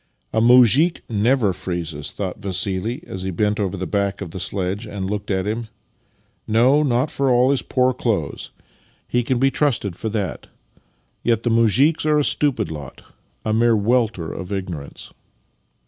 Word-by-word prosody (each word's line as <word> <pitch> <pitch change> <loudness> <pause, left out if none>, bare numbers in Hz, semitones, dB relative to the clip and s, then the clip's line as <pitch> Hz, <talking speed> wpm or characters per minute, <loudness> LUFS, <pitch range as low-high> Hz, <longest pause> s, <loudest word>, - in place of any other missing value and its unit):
" - - -44
A 110 - +2
muzhik 125 - +5
never 110 -1 +2
freezes," 85 -6 -4
thought 95 -2 -5
Vassili 100 - -1
as 95 - -6
he 95 - -3
bent 105 +4 0
over 100 -2 -1
the 95 - -3
back 100 -1 -1
of 90 -5 -6
the 95 - -6
sledge 95 +3 -2
and 100 -2 -4
looked 105 0 -4
at 95 -2 0
him. 110 +2 -3 0.4
" - - -42
No, 130 +6 +5
not 135 +1 +1
for 140 -3 0
all 125 +2 +4
his 140 - +1
poor 130 0 +1
clothes. 105 - -2 0.6
He 120 - +1
can 125 +1 0
be 135 +2 +3
trusted 135 -10 0
Master 110 - -6
and 110 - -4
Man 105 - +1
45 - - -11
for - - -20
that. - - -35 0.7
Yet 115 -2 +1
the 120 - +1
muzhiks 115 - +3
are 150 0 +3
a 150 - +3
stupid 135 - 0
lot 75 -3 -9 0.2
— - - -41
a 110 - 0
mere 115 +1 +3
welter 105 -6 0
of 95 0 -7
ignorance." 90 -7 -6
110 Hz, 195 wpm, -21 LUFS, 95-125 Hz, 0.7 s, muzhik